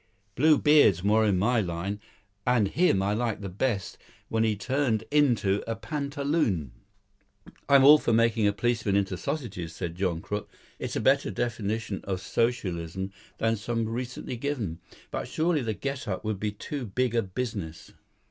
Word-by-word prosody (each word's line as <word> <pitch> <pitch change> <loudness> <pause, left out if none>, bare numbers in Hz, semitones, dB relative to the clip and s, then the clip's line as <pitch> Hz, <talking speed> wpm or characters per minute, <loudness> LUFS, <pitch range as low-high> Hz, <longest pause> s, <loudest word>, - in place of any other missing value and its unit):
Blue 150 +6 +5
Beard's 145 - +5
more 110 +2 +4
in 100 -3 +2
my 115 +5 +2
line, 95 +3 -3 0.5
and 120 -5 +3
him 110 - +2
I 100 +1 +1
like 115 0 -1 0.2
best 105 -8 -1 0.3
when 110 0 +1
he 110 -1 +2
turned 120 0 0
into 120 -9 +3
the 115 - -1
pantaloon." 140 - -1 1.0
"I'm 140 -1 +7
all 150 +2 +9
for 120 - 0
making 115 -1 +3
a - - +4
policeman 105 -1 0
into 100 -2 +1
sausages," 100 - -4
said 85 - -4
John 90 -2 -1
Crook. 105 +4 -5 0.3
"It's - - -4
a - - +1
better 135 -2 +3
definition 110 -1 -2
of 95 -2 -2
Socialism 95 -5 -2 0.3
than 115 0 +1
some 115 +1 -2
recently 125 +1 -4
given. 115 - -3 0.3
But - - -3
surely 160 -1 +1
the 110 -3 -2
get 135 0 -4
up 95 +1 -3
would 110 -3 -2
be 105 +1 -1
too 125 +5 -6
big 125 +4 0
a 115 - +3
business." 100 -5 -5
110 Hz, 160 wpm, -27 LUFS, 100-130 Hz, 1.0 s, all